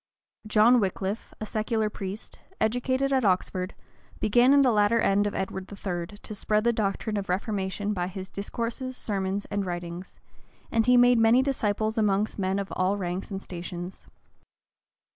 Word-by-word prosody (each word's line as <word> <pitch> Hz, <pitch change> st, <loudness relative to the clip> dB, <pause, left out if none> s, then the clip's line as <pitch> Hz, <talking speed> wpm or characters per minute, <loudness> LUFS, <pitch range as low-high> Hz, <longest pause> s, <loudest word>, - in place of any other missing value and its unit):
John 220 Hz, +3 st, +5 dB
Wickliffe, 195 Hz, +1 st, -2 dB
a 215 Hz, -, -4 dB
secular 215 Hz, 0 st, -1 dB
priest, 200 Hz, +1 st, -7 dB, 0.2 s
educated 260 Hz, +4 st, +1 dB
at 260 Hz, -2 st, +2 dB
Oxford, 185 Hz, -1 st, 0 dB, 0.4 s
began 240 Hz, +5 st, +4 dB
in 285 Hz, 0 st, +6 dB
the 260 Hz, -3 st, +4 dB
latter 210 Hz, +1 st, +3 dB
end 205 Hz, -1 st, +3 dB
of 205 Hz, -, -4 dB
Edward 190 Hz, 0 st, -4 dB
III. 185 Hz, -1 st, -5 dB
to 215 Hz, -, -9 dB
spread 210 Hz, +1 st, 0 dB
the 235 Hz, 0 st, +3 dB
doctrine 210 Hz, 0 st, -1 dB
of 195 Hz, -2 st, -4 dB
reformation 200 Hz, +1 st, -1 dB
by 180 Hz, -2 st, -1 dB
his 190 Hz, 0 st, -6 dB
discourses, 235 Hz, +6 st, -4 dB
sermons, 195 Hz, -1 st, -2 dB
and 205 Hz, 0 st, 0 dB
writings; 175 Hz, 0 st, -6 dB, 0.5 s
and 225 Hz, 0 st, +2 dB
he 250 Hz, 0 st, +6 dB
made 245 Hz, -1 st, +6 dB
many 225 Hz, +3 st, +5 dB
disciples 220 Hz, -4 st, 0 dB
among 205 Hz, -1 st, +3 dB
men 190 Hz, 0 st, 0 dB
of 195 Hz, -3 st, -4 dB
all 185 Hz, +2 st, +1 dB
ranks 180 Hz, -1 st, -3 dB
and 195 Hz, -1 st, -5 dB
stations. 175 Hz, +1 st, -7 dB
205 Hz, 160 wpm, -27 LUFS, 190-225 Hz, 0.5 s, in